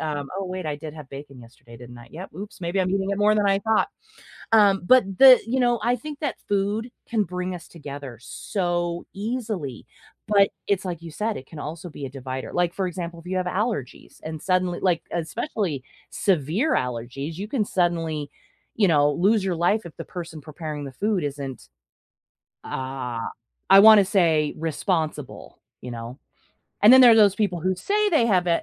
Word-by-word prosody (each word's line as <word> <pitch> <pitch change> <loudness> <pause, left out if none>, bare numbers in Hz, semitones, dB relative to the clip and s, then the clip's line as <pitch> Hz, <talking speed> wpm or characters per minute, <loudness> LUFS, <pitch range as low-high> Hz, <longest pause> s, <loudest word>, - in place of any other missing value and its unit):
um 145 -3 -3
oh, 195 - -3
wait, 185 -2 -5
I 150 -1 -2
did 155 0 -8
have 150 -3 -10
bacon 140 -1 -10
yesterday, 115 0 -15
didn't 120 0 -12
I? 120 - -14
Yep, 180 +5 -9
oops, 200 +3 -9
maybe 175 +3 -1
I'm 185 - 0
eating 195 0 0
it 200 - -1
more 210 +1 +4
than 210 -1 +2
I 195 0 +3
thought. 220 +1 +2 0.6
Um, 200 -3 +5
but 255 +1 +6
the 265 -2 +9
you 255 +3 0
know, 240 -2 +2
I 240 +1 +2
think 295 +4 -8
that 295 -3 -2
food 205 +4 -1 0.2
can 225 -3 +1
bring 180 -1 -4
us 170 - -11
together 140 -6 -9
so 175 - -3
easily, 205 - -4 0.4
but, 200 -1 +4 0.2
it's 200 -2 +1
like 170 -3 -4
you 170 - -8
said, 215 +6 -2
it 130 - -10
can 160 - -10
also 165 +4 -6
be 145 -3 -7
a - - -6
divider, 130 0 -6
like, 175 -1 +1
for 190 -2 -1
example, 170 -1 -6
if 165 - -22
you 185 +1 -1
have 185 - -1
allergies 190 - -3
and 155 -1 -6
suddenly 185 -1 0
like, 180 -4 +2
especially 170 - -3 0.3
severe 190 - +1
allergies, 125 +5 -3
you 205 +3 -5
can 235 -2 0
suddenly, 165 -6 -1 0.5
you 210 -3 +3
know, 145 -2 +4
lose 200 +6 +2
your 185 -2 0
life 175 +6 +1
if 170 - -10
the - - -5
person 165 -3 -8
preparing 155 0 -6
the 135 - -7
food 200 - -1
isn't, 140 - -6 0.9
uh, 130 -3 -4 0.5
I 195 - +9
wanna 215 -1 +9
say, 165 -6 +2
responsible, 160 -2 -3 0.2
you 125 - -7
know, 120 +3 -7 0.6
and 210 +4 +9
then 260 - +9
there 245 - +9
are - - +7
those 205 -3 +6
people 200 -5 -1
who 185 +3 0
say 415 - +1
they 310 -9 +4
have 185 -5 +2
i 170 -1 +2
175 Hz, 195 wpm, -24 LUFS, 150-205 Hz, 0.9 s, the